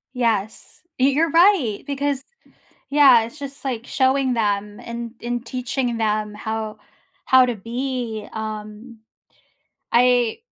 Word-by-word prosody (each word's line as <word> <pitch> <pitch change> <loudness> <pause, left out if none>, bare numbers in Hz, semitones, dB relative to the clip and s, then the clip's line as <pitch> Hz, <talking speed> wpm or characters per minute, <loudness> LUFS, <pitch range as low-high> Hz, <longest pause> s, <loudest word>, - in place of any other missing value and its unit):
Yes, 220 -4 -2 0.2
y 260 - +4
you're 305 +4 +2
right, 330 - +3
because 280 -1 -2 0.7
yeah, 275 -5 +7
it's 235 +6 -9
just, 280 0 -8
like, 245 -3 -3
showing 265 -1 +2
them 205 -2 -1
and 235 0 -6
and 240 0 -3
teaching 250 -1 -2
them 215 -1 -1
how 220 0 -4 0.5
how 260 -1 +6
to 240 - -1
be, 235 0 -4
um, 215 +2 -7 0.9
I 245 -1 +3
240 Hz, 120 wpm, -22 LUFS, 220-265 Hz, 0.9 s, yeah